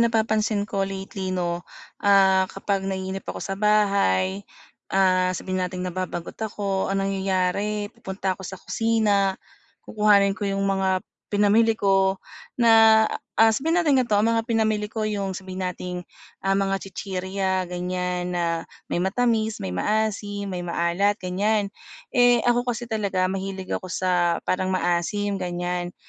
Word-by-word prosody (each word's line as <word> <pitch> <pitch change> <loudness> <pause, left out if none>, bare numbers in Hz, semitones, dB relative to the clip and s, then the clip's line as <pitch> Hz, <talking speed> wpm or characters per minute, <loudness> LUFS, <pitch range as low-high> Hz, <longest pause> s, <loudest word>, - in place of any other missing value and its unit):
napapansin 220 -2 +1
ko 200 -1 -3
lately 195 0 -4
'no, 175 -2 -1 0.4
ah, 190 -2 +4
kapag 195 0 -2
naiinip 190 0 -3
ako - - -4
sa 195 - -3
bahay, 195 - +2 0.5
ah, 185 -1 +3
sabihin 185 +1 -3
nating 180 0 -3
nababagot 180 -1 -5
ako, 200 -3 -2
ang 195 0 0
nangyayari 195 +2 -1
pupunta 190 -4 -3
ako 190 - -10
sa 190 - -7
kusina, 205 -2 +1 0.5
kukuhanin 205 -2 +4
ko 205 0 -3
yung 195 0 -1
mga 190 -1 +1 0.3
pinamili 215 +2 +3
ko 195 -1 +2 0.4
na, 225 -2 +6 0.3
ah, 225 0 +6
sabihin 325 +8 +1
natin 290 -6 +3
gantio, 215 -4 +1
ang 225 +2 +3
mga 225 - +1
pinamili 215 -2 +1
ko 220 -1 -2
yung 200 -2 -2
sabihin 185 0 -6
nating, 180 0 -4 0.4
ah, 195 0 +2
mga 195 0 0
chichirya 190 -1 -3
gan'yan 180 0 -2
na 170 -1 -1 0.2
may - - 0
matamis, 220 +3 0
may 95 - -3
maasim, 205 - -1
may 180 -1 -4
maalat 170 +4 +1
gan'yan. 200 +3 0 0.4
Eh, 245 -2 +4
ako 245 0 +2
kasi 240 0 -7
talaga 195 -4 0
mahilig 190 0 -5
ako - - -3
sa 175 -1 0
parang 185 +1 0
maasim 185 +3 0
gan'yan. 175 -1 -3
195 Hz, 140 wpm, -24 LUFS, 185-210 Hz, 0.5 s, na